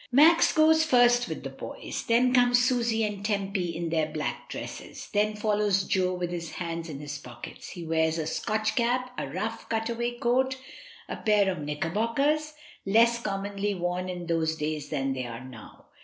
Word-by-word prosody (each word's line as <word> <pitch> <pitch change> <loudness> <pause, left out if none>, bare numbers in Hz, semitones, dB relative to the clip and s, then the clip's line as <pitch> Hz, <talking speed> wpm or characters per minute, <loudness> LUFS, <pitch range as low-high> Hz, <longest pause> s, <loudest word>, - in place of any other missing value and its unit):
Max 315 +6 +6
goes 315 0 +5
first 245 -4 +4
with - - -5
the - - -5
boys, - - -6
then 245 +2 +4
come 245 -1 +5
Susy 240 -2 +2
and 205 -2 -3
Tempy 195 -4 -1
in 170 0 -3
their 160 -2 +1
black 155 -1 -4
dresses; - - -7
then 210 +1 +2
follows 210 -2 +1
Jo, 185 -1 +1
with 175 -1 -3
his 170 -2 -5
hands 165 -1 -4
in 145 - -5
his 145 -1 -6
pockets. 120 -3 -10
He 175 - -7
wears 160 0 +1
a 160 - -2
Scotch 215 +6 -1
cap, 250 +1 0
a - - -3
rough, 215 +10 -4
cut 225 0 -1
away 235 +1 -2
coat, 260 +2 +1 0.5
a - - -5
pair 205 -3 +3
of 180 - -5
knicker 150 +2 -3
bockers, 280 - +1 0.3
less 235 +4 +4
commonly 200 0 -2
worn 180 +1 -2
in 175 -1 -5
those 165 -1 0
days 150 -1 -3
than 135 -3 -1
they 130 -2 -4
are 115 +1 -7
now. 120 -4 -12
200 Hz, 185 wpm, -27 LUFS, 165-235 Hz, 0.5 s, Max